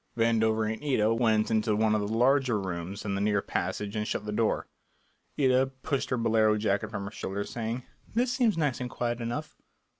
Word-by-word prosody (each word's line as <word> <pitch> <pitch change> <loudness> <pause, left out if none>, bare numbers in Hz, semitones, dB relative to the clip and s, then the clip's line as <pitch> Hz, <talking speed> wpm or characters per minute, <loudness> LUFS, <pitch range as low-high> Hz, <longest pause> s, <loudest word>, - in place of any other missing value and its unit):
Vandover 110 -1 +2
and 110 - -9
Ida 115 -6 +2
went 110 -2 +2
into 110 -1 +2
one 110 0 +2
of 110 - +2
the 100 - -2
larger 125 +1 +3
rooms 95 +1 -5
in 100 - -1
the 100 - -1
rear 105 0 +2
passage 100 +2 -3
and 105 0 -1
shut - - -2
the 105 - -3
door. 110 +1 +1 0.7
Ida 130 -1 +4
pushed 135 +1 -3
her 125 - 0
bolero 110 -2 +3
jacket 100 -2 0
from 100 -2 -4
her 100 - -6
shoulders, 100 -1 -4
saying, 115 +2 -3 0.3
"This 245 +1 +2
seems 230 -8 +2
nice 145 -6 0
and 125 - -3
quiet 120 -1 -2
enough." 120 +7 -4
110 Hz, 200 wpm, -28 LUFS, 105-125 Hz, 0.7 s, Ida